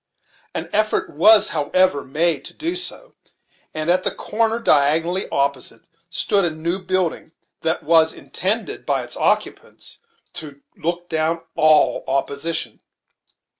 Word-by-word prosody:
An -, -, -3 dB
effort 215 Hz, +1 st, 0 dB
was, 210 Hz, +7 st, +6 dB
however, 165 Hz, 0 st, +1 dB
made 155 Hz, +3 st, 0 dB
to -, -, -9 dB
do 335 Hz, +3 st, -3 dB
so; -, -, -7 dB, 0.6 s
and 155 Hz, 0 st, -3 dB
at 185 Hz, +1 st, +3 dB
the -, -, 0 dB
corner 225 Hz, +1 st, -1 dB
diagonally 165 Hz, -2 st, +2 dB
opposite, 140 Hz, -4 st, -2 dB, 0.3 s
stood 195 Hz, +3 st, +1 dB
a 175 Hz, -, +2 dB
new 165 Hz, +4 st, -3 dB
building 185 Hz, -3 st, -2 dB, 0.3 s
that 160 Hz, +1 st, -1 dB
was 160 Hz, +1 st, +4 dB
in 135 Hz, -, -14 dB
tended, 210 Hz, +9 st, -2 dB
by -, -, 0 dB
its -, -, -9 dB
occupants, -, -, -2 dB, 0.3 s
to 145 Hz, -3 st, -9 dB, 0.2 s
look 175 Hz, +1 st, -3 dB
down 160 Hz, 0 st, -1 dB
all 155 Hz, -1 st, +4 dB
opposition. 140 Hz, +4 st, -2 dB
165 Hz, 130 wpm, -21 LUFS, 155-185 Hz, 0.6 s, was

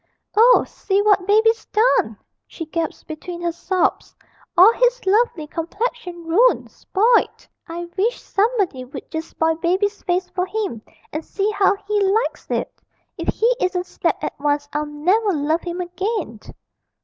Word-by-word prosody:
'Oh, 475 Hz, +4 st, +6 dB
see 390 Hz, 0 st, -1 dB
what 400 Hz, -3 st, +3 dB
Baby's 445 Hz, +2 st, +3 dB
done!' 445 Hz, +4 st, +2 dB, 0.3 s
she 330 Hz, -, -7 dB
gasped 325 Hz, +1 st, -4 dB
between 340 Hz, +2 st, -7 dB
her 340 Hz, -, 0 dB
sobs; 365 Hz, +2 st, -1 dB, 0.4 s
'all 375 Hz, +6 st, +9 dB
his -, -, +2 dB
lovely 390 Hz, -5 st, +2 dB
complexion 350 Hz, +2 st, -4 dB
ruined, 440 Hz, +10 st, +3 dB
spoilt... 455 Hz, +5 st, +1 dB, 0.2 s
I 340 Hz, +1 st, -5 dB
wish 440 Hz, +6 st, 0 dB
somebody 400 Hz, -, 0 dB
would 260 Hz, +1 st, -10 dB
just 320 Hz, 0 st, -4 dB
spoil 325 Hz, 0 st, +1 dB
Baby's 380 Hz, +5 st, 0 dB
face 360 Hz, 0 st, -1 dB
for 365 Hz, 0 st, -1 dB
him, 400 Hz, -, -3 dB, 0.3 s
and 310 Hz, +1 st, -3 dB
see 405 Hz, +5 st, -1 dB
how 405 Hz, -1 st, +3 dB
he 420 Hz, 0 st, +1 dB
likes 400 Hz, +4 st, 0 dB
it.... -, -, -3 dB, 0.4 s
If -, -, -5 dB
he 475 Hz, +3 st, +2 dB
isn't 365 Hz, -1 st, 0 dB
slapped -, -, -2 dB
at -, -, -2 dB
once 290 Hz, 0 st, 0 dB
I'll 300 Hz, 0 st, -1 dB
never 370 Hz, +8 st, +1 dB
love 310 Hz, +2 st, 0 dB
him 350 Hz, 0 st, -5 dB
again!' 360 Hz, -, -3 dB
370 Hz, 150 wpm, -21 LUFS, 330-430 Hz, 0.4 s, all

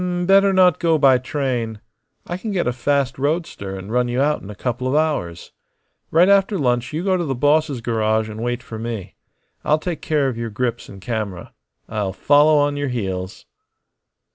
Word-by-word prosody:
"Better 195 Hz, +1 st, +5 dB
not 185 Hz, -3 st, +4 dB
go 165 Hz, -2 st, +2 dB
by 135 Hz, -3 st, +5 dB
train. 125 Hz, -5 st, -3 dB, 0.5 s
I 175 Hz, -, -4 dB
can 220 Hz, +4 st, -6 dB
get 190 Hz, -4 st, 0 dB
a 125 Hz, -, 0 dB
fast 135 Hz, +1 st, 0 dB
roadster 140 Hz, -, -2 dB
and 95 Hz, +3 st, -8 dB
run 125 Hz, +1 st, +1 dB
you 120 Hz, +1 st, -2 dB
out 150 Hz, +2 st, +1 dB
in 95 Hz, -, -10 dB
a 105 Hz, -, -8 dB
couple 125 Hz, +3 st, -3 dB
of 130 Hz, -, 0 dB
hours. 150 Hz, -, -1 dB, 0.6 s
Right 170 Hz, +3 st, +4 dB
after 200 Hz, 0 st, +3 dB
lunch 125 Hz, -4 st, 0 dB
you 155 Hz, +3 st, -3 dB
go 190 Hz, -1 st, +2 dB
to 175 Hz, -, -1 dB
the 135 Hz, -5 st, -2 dB
boss's 145 Hz, 0 st, +1 dB
garage 110 Hz, -1 st, 0 dB
and 110 Hz, 0 st, -7 dB
wait 120 Hz, +1 st, -2 dB
for 110 Hz, -1 st, -8 dB
me. 115 Hz, -4 st, -5 dB, 0.5 s
I'll 150 Hz, -, +3 dB
take 165 Hz, +1 st, -5 dB
care 150 Hz, -3 st, +1 dB
of 120 Hz, -3 st, -3 dB
your 115 Hz, -1 st, -3 dB
grips 120 Hz, +2 st, -3 dB
and 95 Hz, -1 st, -11 dB
camera. 105 Hz, -5 st, -4 dB, 0.3 s
I'll 105 Hz, -3 st, -3 dB
follow 145 Hz, +7 st, +4 dB
on 145 Hz, 0 st, +1 dB
your 145 Hz, 0 st, -1 dB
heels." 95 Hz, -6 st, -4 dB
130 Hz, 190 wpm, -21 LUFS, 110-155 Hz, 0.6 s, Better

